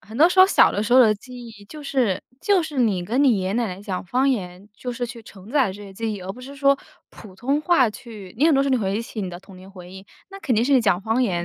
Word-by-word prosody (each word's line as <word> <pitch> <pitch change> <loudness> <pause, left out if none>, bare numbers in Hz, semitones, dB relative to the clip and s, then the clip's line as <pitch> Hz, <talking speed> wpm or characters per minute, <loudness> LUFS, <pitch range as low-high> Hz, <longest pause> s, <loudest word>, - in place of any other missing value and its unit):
很 220 +3 -12
多 315 +6 +6
时 360 - -2
候 375 - +9
小 - - +5
的 205 - -1
时 225 +3 -2
候 260 - +8
的 220 -4 +5
记 245 +2 -11
忆 215 -3 -13
就 300 +7 -11
是 255 -9 -1 0.2
就 395 -4 +2
是 305 -3 -6
你 205 -8 +1
跟 245 +9 0
你 245 -7 +4
爷 185 - -3
爷 - - -2
奶 235 +2 0
奶 185 -1 -7
讲 190 -3 -5
方 255 +9 +1
言， 190 -5 -3
就 245 +3 -6
是 245 0 -4
去 235 -1 -10
承 200 0 -14
载 260 -8 +2
这 205 - -11
些 200 -1 -11
记 220 +2 -3
忆， 205 - -7
而 185 +1 -6
不 245 - -13
是 270 +2 -10
说 275 0 +3 0.3
普 200 -5 -14
通 275 +8 -1
话 305 -9 +3
去 210 -4 -11
你 300 - +4
很 320 - +4
多 275 - +3
时 275 - -1
候 - - -1
你 260 - +3
回 195 -2 -1
忆 230 - -2
起 225 -1 -7
你 190 - -3
的 175 -1 -8
童 195 -1 -15
年 185 +1 -14
回 180 -2 -12
忆， 190 +1 -12 0.2
那 390 - -9
肯 255 - 0
定 220 +2 +2
是 280 - +1
你 260 - +5
讲 195 -5 +1
方 225 +5 0
言 175 -7 -1
225 Hz, 340 characters per minute, -22 LUFS, 195-265 Hz, 0.3 s, 候